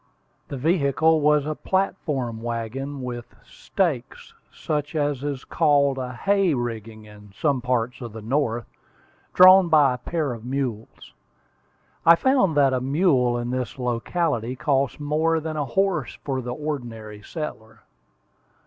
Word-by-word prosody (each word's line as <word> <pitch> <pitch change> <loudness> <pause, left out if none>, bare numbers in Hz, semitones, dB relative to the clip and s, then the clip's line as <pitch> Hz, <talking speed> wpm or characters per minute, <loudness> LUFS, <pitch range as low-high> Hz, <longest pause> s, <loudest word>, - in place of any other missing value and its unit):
The 140 - -6
vehicle 160 +1 +2
was 150 -1 +3
a 155 - -2
platform 150 -11 -2
wagon, 120 +4 -4
with 120 -1 -7
stakes, - - -3 0.2
such 150 -1 -3
as 145 -3 -1
is 140 -3 -3
called 140 -4 +2
a 125 -1 -4
"hay 195 +3 +1
rigging" 115 -3 -5
in 105 -1 -15
some 140 +3 0
parts 125 0 -1
of 120 -2 -6
the 110 +1 -9
North, 120 -1 -1 0.7
drawn 185 0 +8
by 145 -5 +5
a 125 - -6
pair 155 -2 -2
of 115 -2 -9
mules. 125 -4 -5 0.9
I 170 - +8
found 195 - +2
that 135 -2 +4
a 130 - 0
mule 135 -4 +2
in 120 0 -3
this 130 +2 -3
locality 125 +1 -1
cost 140 -1 0
more 155 +2 +1
than 160 0 -5
a 145 -2 -2
house 190 -8 -1
for 135 -2 -2
the 125 0 -5
ordinary 120 -8 -6
settler. 115 -6 -8
135 Hz, 140 wpm, -24 LUFS, 120-155 Hz, 0.9 s, drawn